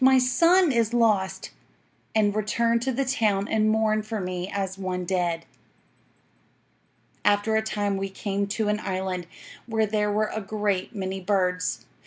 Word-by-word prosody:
My 265 0 +7
son 335 +7 +4
is 235 -1 +1
lost!" 210 -5 +1 0.6
and 210 -2 +3
returned 230 +2 +1
to 265 +2 0
the 270 +2 -1
town 210 -6 +1
and 215 -1 +2
mourned 215 -1 +1
for 220 -1 -3
me 180 0 -4
as 195 -2 -2
one 185 -2 -3
dead. 175 -2 -1 1.8
"'After 205 +2 +2
a 220 - +3
time 205 -2 -1
we 195 0 -3
came 200 +1 -2
to 210 +2 -1
an 210 0 +1
island, 185 -3 -3 0.4
where 220 -1 +1
there 210 0 0
were 215 +1 0
a 220 - -3
great 205 0 -2
many 190 -1 -3
birds. 180 -1 0
210 Hz, 155 wpm, -25 LUFS, 190-220 Hz, 1.8 s, My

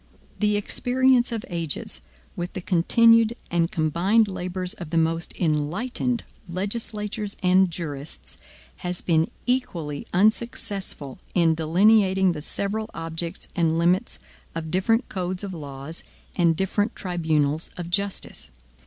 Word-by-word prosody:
The 210 -1 +3
experience 250 +3 +2
of 225 -2 -3
ages, 170 -6 -3 0.3
with 175 +1 -4
the 190 - -4
continued 230 +6 +5 0.2
and 170 -1 +2
combined 180 +8 +2
labors 185 0 -3
of 175 -8 -8
the 165 - 0
most 165 +1 +1
enlightened 190 - 0 0.3
legislatures 210 +2 -3
and 185 +1 +5
jurists, 155 -4 -6 0.4
has 180 0 -4
been 160 -2 +2 0.2
equally 175 - -1
unsuccessful 195 - 0 0.2
in 170 -3 +5
delineating 190 +3 +4
the 155 -3 -5
several 210 +7 -2
objects 165 +2 -5
and 165 -2 +2
limits 175 +3 +2 0.4
of 160 -1 -4
different 225 +6 +2
codes 185 0 -3
of 195 -2 -4
laws 145 0 -7 0.3
and 170 -2 +3
different 205 +3 0
tribunals 160 -4 0
of 175 -1 -5
justice. 200 +1 -2
180 Hz, 120 wpm, -25 LUFS, 165-210 Hz, 0.4 s, continued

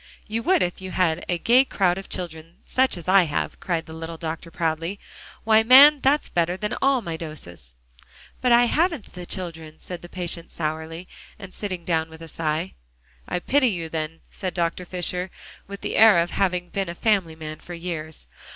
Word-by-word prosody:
"You 225 +1 -2
would 365 +5 +3
if 175 +1 -3
you 185 - -6
had 180 -2 +1
a 175 - +1
gay 240 +9 +5
crowd 190 -8 +1
of 195 - -11
children 165 -1 -5
such 260 -6 +2
as 170 - -10
I 190 -1 +6
have," 150 - -3
cried 175 -4 -2
the 160 - -10
little 165 0 -6
doctor 165 +1 -5
proudly. 165 +4 -2 0.4
"Why, 220 0 +5
man, 275 +6 +9
that's 285 +3 +3
better 175 +1 0
than 210 +1 -3
all 270 -3 +3
my 165 -1 -4
doses." 85 - -9 0.7
"But 250 - +2
I 240 +1 +7
haven't 320 - 0
the 180 -1 -8
children," 165 -4 -6
said 180 -2 -8
the 175 - -11
patient 175 -2 -4
sourly, 160 +2 -4 0.3
and 195 -3 -10
sitting 185 -5 -5
down 160 -2 0
with 160 +1 -12
a - - -9
sigh. 160 +2 -2 0.5
"I - - -1
pity 260 +9 +2
you, 170 -5 -4
then," 160 0 -4
said 185 -3 -5
Dr. 170 +1 -1
Fisher, 180 +1 -3 0.4
with 200 0 -8
the - - -3
air 220 -3 +7
of 170 +1 +1
having 180 -2 0
been 195 -3 -2
a 170 - -5
family 190 -6 +1
man 155 -1 -7
for 175 - -9
years. 160 - -5
175 Hz, 195 wpm, -24 LUFS, 165-200 Hz, 0.7 s, man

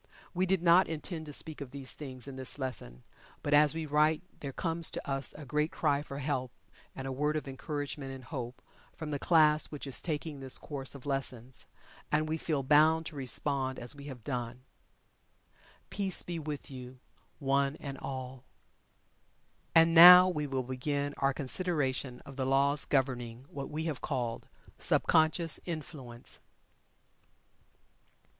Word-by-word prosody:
We 185 +1 +1
did 185 -2 +1
not 175 +2 +6
intend 160 0 -5
to - - -6
speak 155 0 -3
of 140 - -6
these 135 0 -5
things 130 -3 -8
in 135 - -7
this 130 +1 -2
lesson, 95 - -6 0.4
but 145 - 0
as 150 +1 +5
we 165 -1 -3
write 155 +3 +2 0.2
there 140 - -5
comes 165 +3 0
to - - -5
us 135 -4 -1
a 150 - -9
great 150 +4 0
cry 145 -3 +1
for 140 -2 -8
help 135 -2 -2 0.5
and 135 - -6
a 135 - -3
word 150 +3 0
of 155 - -3
encouragement 145 0 -4
and 130 -1 -9
hope, 125 -3 -6 0.3
from 155 -2 -6
the 145 - -2
Class 155 -2 +4
which 150 -2 -7
is 135 - -3
taking 155 -2 -3
this 130 -1 -2
course 140 -2 -1
of 140 - -11
lessons, 130 -3 -3 0.4
and 155 +1 +2
we 160 +1 -2
feel 150 -4 -1
bound 155 +4 +4
to 155 - -7
respond 130 0 0
as 120 - -5
we 140 -1 -11
have 130 -5 -9
done. 125 -2 -4 1.3
Peace 195 -3 +1
be 170 -1 -4
with 150 -1 -6
you 130 -1 -9 0.4
one 140 0 +1
and 140 -3 -7
all. 130 -1 -6 1.3
And, 165 0 +6
now 180 +2 +11
we 150 -5 -1
will 135 -2 -2
begin 140 +3 -2
our 135 0 +2
consideration 135 -3 -1
of 140 -1 -11
the 130 - -1
laws 140 +2 +2
governing 125 -3 -1
what 140 -1 -6
we 155 +1 -3
have 155 -5 -3
called 120 -5 -3 0.3
"Sub - - +2
conscious 160 +1 +3
Influence." 140 -7 -7
140 Hz, 165 wpm, -31 LUFS, 130-155 Hz, 1.3 s, now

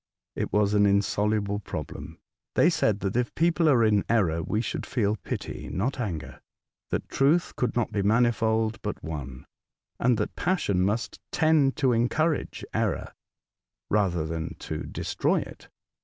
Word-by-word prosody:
It - - -2
was 105 -1 +2
an 105 -1 +5
in 100 0 +4
soluble 100 0 0
problem. 105 - -7 0.4
They - - +5
said 105 -2 +1
that 95 +2 -2
if 120 -1 0
people 165 -1 +3
are 125 -5 +5
in 105 -2 +3
error 90 -8 +2
we 105 +6 -1
should 115 - -3
feel 105 -4 0
pity, - - -5
not 125 +8 -2
anger; 90 -10 -4 0.5
that - - -2
truth 150 +6 +2
could 125 - -1
not 120 -2 0
be 100 - 0
manifold, 110 0 +2
but - - -5
one; 70 -5 -6 0.5
and 125 -1 +3
that 105 - -2
passion 160 - +1
must 105 +5 -1
tend 155 -4 +3
to 130 -3 +2
encourage 150 +7 0
error, - - -1 0.8
rather 95 -6 +2
than 80 0 -4
to - - -5
destroy - - 0
it. - - -11
110 Hz, 155 wpm, -27 LUFS, 100-125 Hz, 0.8 s, an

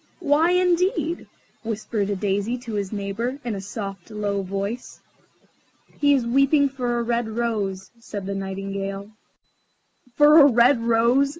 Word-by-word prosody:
"Why, 315 0 +3
indeed?" 360 0 +1 0.3
whispered 215 -2 -3
a 205 - 0
Daisy 205 +4 -1
to 240 -2 -8
his 200 -2 -3
neighbour, 215 +6 -3
in 235 - -2
a 195 - -5
soft, 195 -2 -7
low 205 -2 -2
voice. 200 +5 -5 1.0
"He 285 -1 +4
is 255 -3 0
weeping 275 +4 +3
for 250 -3 -2
a 235 - 0
red 235 -1 -1
rose," 215 -5 -3
said 205 -4 -7
the 200 - -3
Nightingale. 195 +1 -5 1.0
"For 300 +2 +7
a 285 - +8
red 240 +2 +4
rose?" 235 +4 +3
230 Hz, 140 wpm, -23 LUFS, 200-265 Hz, 1.0 s, a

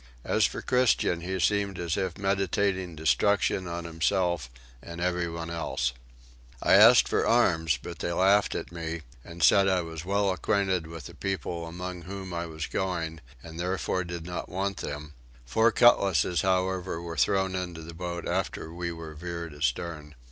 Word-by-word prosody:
As - - +3
for - - -7
Christian 125 -9 +2
he 95 +2 -3
seemed 100 0 +1
as 85 -2 -1
if 95 -4 -2
meditating 95 -2 0
destruction 95 +4 +2
on 85 0 -4
himself 85 -2 0 0.3
and 85 0 -8
everyone 85 -2 -2
else. 70 -7 -1 0.7
I - - +3
asked - - +8
for - - +1
arms 80 -1 +3
but 85 -3 -9
they 85 - -2
laughed 100 +3 +3
at - - -4
me, 85 -1 -4 0.2
and 85 -1 -6
said 100 +4 +6
I 95 -2 +2
was 80 -1 -7
well 100 +1 +1
acquainted 95 -2 0
with 80 -3 -9
the - - -9
people 90 -3 -3
among 90 +1 -6
whom 95 0 -7
I 85 0 -3
was 80 -1 -5
going, 85 -4 -3 0.2
and 80 0 -9
therefore 90 0 -1
did 85 -1 -6
not 90 -1 -5
want 95 +1 -2
them; 75 0 -6 0.3
four 110 - +3
cutlasses 95 -8 +4
however 95 -2 0
were 85 -1 -6
thrown 95 +3 +2
into 90 -3 -4
the 85 +1 -9
boat 85 0 -5
after 80 - -2
we 85 0 -3
were 80 -2 -8
veered 85 0 -6
astern. 75 +2 -3
85 Hz, 165 wpm, -28 LUFS, 80-95 Hz, 0.7 s, asked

